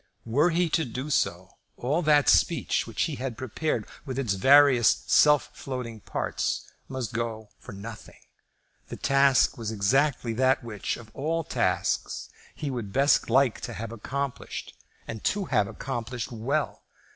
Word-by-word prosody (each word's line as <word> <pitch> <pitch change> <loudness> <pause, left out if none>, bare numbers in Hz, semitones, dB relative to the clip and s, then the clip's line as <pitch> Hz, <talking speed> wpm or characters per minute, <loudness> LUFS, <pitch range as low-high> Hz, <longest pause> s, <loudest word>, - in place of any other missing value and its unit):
Were 140 +9 +3
he 175 +1 +1
to 165 - +2
do 130 +3 -5
so, 90 -5 -1 0.2
all 145 +8 0
that 150 -3 +4
speech 165 -8 +2
which 115 - -1
he 150 -4 -2
had 125 -3 -4
prepared, 130 +5 -2 0.2
with 130 -4 -5
its 125 -7 0
various 135 +2 +5
self 150 -1 +4
floating 125 -4 -6
parts, - - -2 0.2
must 130 -5 -4
go 115 -2 -4
for - - -11
nothing. 105 +3 -10 0.7
The - - -7
task 135 -2 +3
was 115 -2 -3
exactly 120 +4 +1
that 130 +2 +2
which, 110 -4 -4
of 110 -3 -13
all 165 +4 -1
tasks, - - -1 0.2
he 145 - -4
would 115 -6 -5
best 135 +3 +3
like 130 0 +3
to - - -5
have 115 +1 -6
accomplished, 135 +4 -5 0.3
and 110 -2 -6
to 205 -2 0
have 100 - +1
accomplished 120 0 -5
well. 130 +6 -2
130 Hz, 150 wpm, -27 LUFS, 115-140 Hz, 0.7 s, various